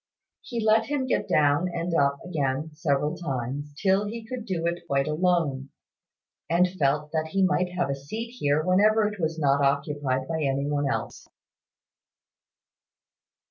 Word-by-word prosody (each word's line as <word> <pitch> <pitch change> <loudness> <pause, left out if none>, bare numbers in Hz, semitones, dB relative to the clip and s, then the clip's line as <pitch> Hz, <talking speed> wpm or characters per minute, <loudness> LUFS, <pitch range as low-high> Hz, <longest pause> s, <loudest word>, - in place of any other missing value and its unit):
He 240 -2 -5
let 220 +1 +4
him 285 -2 -1
get 255 - 0
down 150 +4 +3
and 170 0 -3
up 140 -2 +1
again 150 -3 -2
several 150 -2 0
times, 140 -1 -4
till 195 +1 +2
he 225 +1 -6
could 235 -1 -6
do 170 -4 -2
it 170 +1 -2
quite 135 0 +1
alone, 155 -4 0 0.8
and 175 +2 +4
felt 150 -4 0
that 160 -1 -1
he 195 +4 +1
might 185 -1 +1
have 175 -5 0
a - - +1
seat 220 +13 -6
here 150 -10 0
whenever 210 +4 +4
it 210 -1 -6
was 160 -1 -1
not 140 -2 +2
occupied 140 -2 0
by 160 -1 -2
any 140 0 0
one 145 -1 0
else. - - -4
160 Hz, 155 wpm, -26 LUFS, 140-185 Hz, 0.8 s, let